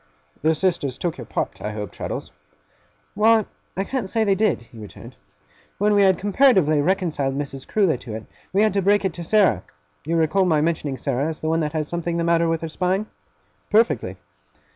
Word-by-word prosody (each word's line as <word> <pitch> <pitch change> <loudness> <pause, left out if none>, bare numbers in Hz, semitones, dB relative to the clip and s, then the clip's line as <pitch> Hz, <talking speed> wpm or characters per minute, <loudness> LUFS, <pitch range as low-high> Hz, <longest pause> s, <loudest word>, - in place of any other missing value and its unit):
'The 160 +1 +3
sisters 155 -7 0
took 170 -5 -3
your 120 - -6
part, - - -3
I 105 +1 -4
hope, 105 -3 -5
Traddles?' - - -5 0.8
'Why, 220 0 +4 0.3
I 195 - +1
can't 235 -2 -3
say 225 +2 +1
they 200 -2 +3
did,' 205 - +1
he 115 -1 -15
returned. 105 -2 -11 0.6
'When 210 +1 +2
we 205 - +4
had 190 -2 +4
comparatively 195 - +3
reconciled 155 -6 0
Mrs. 135 -2 -5
Crewler 190 -10 +2
to 115 -3 -8
it, 110 -1 -7 0.3
we 200 +2 +3
had 215 - +2
to 200 - +1
break 205 +1 +3
it 190 - 0
to 170 - -6
Sarah. 185 - +3 0.4
You 165 +3 -1
recollect 180 +4 +2
my 155 -3 +3
mentioning 150 -3 -1
Sarah, 140 +1 -1
as 160 -1 -4
the 155 - -1
one 165 +1 +2
that 150 -2 -2
has 155 -2 -1
something 170 0 -2
the 170 - 0
matter 170 0 +2
with 165 -1 -1
her 165 - -4
spine?' 185 +5 0 0.6
'Perfectly! 225 +2 +2
170 Hz, 200 wpm, -22 LUFS, 145-195 Hz, 0.8 s, Why